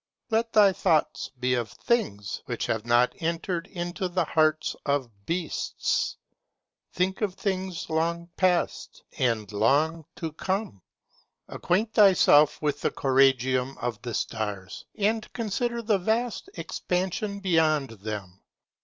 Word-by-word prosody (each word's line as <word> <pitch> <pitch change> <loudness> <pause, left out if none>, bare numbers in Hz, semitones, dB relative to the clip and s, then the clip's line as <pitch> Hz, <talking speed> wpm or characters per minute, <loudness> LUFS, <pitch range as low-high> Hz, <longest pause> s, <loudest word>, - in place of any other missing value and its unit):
Let 225 +1 +1
thy 205 -3 +6
thoughts 165 -4 +1
be 125 0 +1
of 120 -3 -1
things 105 - -1
which - - -2
have 115 0 -2
not 120 +1 +4
entered 170 +2 -2
into 175 +1 -4
the 175 -1 0
hearts 155 0 +1
of 140 -4 0 0.2
beasts: 170 -1 -1 0.7
think 185 +3 -1
of 200 -4 -1
things 190 -4 -3
long 170 +1 -1
past, 180 -2 0 0.2
and 115 -5 0
long 145 +10 +2
to 165 -2 -4
come: 190 - -3 0.7
acquaint 210 +5 -1
thyself 155 -7 +6
with 145 -1 0
the - - +2
choragium 130 -1 +2
of 120 -3 -4
the 120 -2 -4
stars, 105 -4 -4
and 215 +2 0
consider 235 +1 -2
the 210 -3 +2
vast 230 - -1
expansion 195 +3 -2
beyond 160 -8 +2
them. 100 -3 -6
165 Hz, 125 wpm, -27 LUFS, 125-195 Hz, 0.7 s, thy